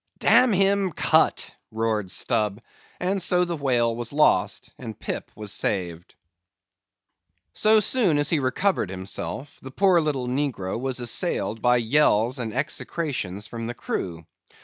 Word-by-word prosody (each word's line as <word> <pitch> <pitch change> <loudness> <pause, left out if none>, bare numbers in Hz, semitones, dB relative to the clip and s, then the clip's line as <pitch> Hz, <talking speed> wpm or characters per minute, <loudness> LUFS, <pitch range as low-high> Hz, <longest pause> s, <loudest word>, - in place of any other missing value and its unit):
"Damn 250 -1 +5
him, 195 -1 +2
cut!" - - +2 0.2
roared 110 -3 -1
Stubb; 105 0 0 0.4
and 190 +2 -1
so 180 0 +3
the 175 -1 -3
whale 120 -6 +1
was 120 0 -4
lost 150 +1 +2
and 115 -4 -8
Pip - - -5
was 105 -1 -7
saved. 85 -3 -2 1.4
So 215 0 +4
soon 210 - +2
as 145 0 0
he 160 - +2
recovered 130 - 0
himself, 95 +8 -6
the 130 - -9
poor 180 +4 +3
little 140 -5 -2
negro 125 -7 -2
was 130 0 -3
assailed 120 - -1
by 125 +1 +4
yells 120 0 +2
and 115 -3 -3
execrations 125 - -3
from 115 +1 -6
the 120 - -5
crew. 85 -7 -5
125 Hz, 140 wpm, -24 LUFS, 110-165 Hz, 1.4 s, Damn